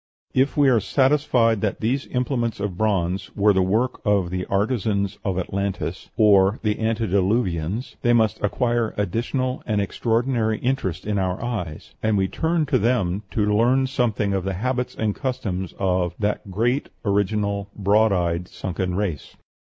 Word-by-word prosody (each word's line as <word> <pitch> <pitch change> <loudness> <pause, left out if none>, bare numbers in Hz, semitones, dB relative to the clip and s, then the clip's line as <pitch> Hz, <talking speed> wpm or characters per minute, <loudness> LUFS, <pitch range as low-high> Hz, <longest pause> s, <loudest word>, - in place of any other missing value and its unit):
If 135 +4 +2
we 145 -1 +5
are 125 -4 +5
satisfied 125 -3 +2
that 105 -3 -1
these 125 +5 -1
implements 125 -3 -1
of 100 -2 -3
bronze 95 -2 0
were 105 0 +4
the 95 - +2
work 110 +7 0
of 100 -5 +1
the 90 0 -3
artisans 100 -1 0
of 95 -2 -1
Atlantis 95 -1 -3
of 100 -1 +5
the 105 -1 0
antediluvians 105 -2 0
they 120 - +3
must 110 -2 +2
acquire 120 +1 0
additional 125 - -1
and 105 -3 +1
extraordinary 115 +2 0
interest 120 -10 -2
in 105 -1 0
our 95 -1 -1
eyes, 105 -11 -5
and 110 -1 +1
we 95 -1 +2
turn 160 - 0
to 135 -3 +1
them 105 -5 +1
to 105 -1 +1
learn 125 +4 +3
something 115 -6 0
of 95 -2 -1
the 95 0 -2
habits 125 +5 -2
and 110 -2 0
customs 100 - -3
of 90 -2 0
"that 105 -1 -2
great, 120 +8 0 0.2
original, 100 0 0
broad 105 +2 +3
eyed, 90 -1 0
sunken 90 -1 -3
race." 95 -7 -3
105 Hz, 155 wpm, -23 LUFS, 95-120 Hz, 0.2 s, we